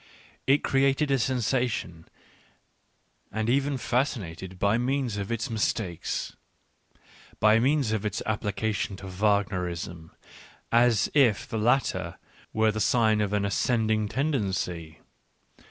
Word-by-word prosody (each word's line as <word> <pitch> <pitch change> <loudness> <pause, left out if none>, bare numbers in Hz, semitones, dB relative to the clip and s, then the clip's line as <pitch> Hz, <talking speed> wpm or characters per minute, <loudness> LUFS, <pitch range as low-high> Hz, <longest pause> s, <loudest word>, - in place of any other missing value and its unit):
It 140 +2 +4
created 135 +2 +2
a 135 - +3
sensation 120 -8 -1 1.2
and 110 +1 -2
even 140 +1 +1
fascinated 100 - -2
by 100 +5 +2
means 130 -2 -1
of 100 +2 -4
its 115 +2 -1
mistakes 105 -5 -2 0.5
— - - -35 0.3
by 110 +1 +5
means 135 -1 +2
of 110 -2 -1
its 105 -2 -2
application 105 -1 -2
to 95 - -10
Wagner 95 -2 0
ism, 85 -1 -7 0.6
as 115 -2 +3
if 125 -4 +3
the 115 -4 -3
latter 105 -7 +1 0.3
were 110 0 +2
the 110 - -4
sign 110 -3 +3
of 100 -1 -1
an 105 -1 +1
ascending 110 +2 +1
tendency. 95 - -2
110 Hz, 120 wpm, -27 LUFS, 100-125 Hz, 1.2 s, by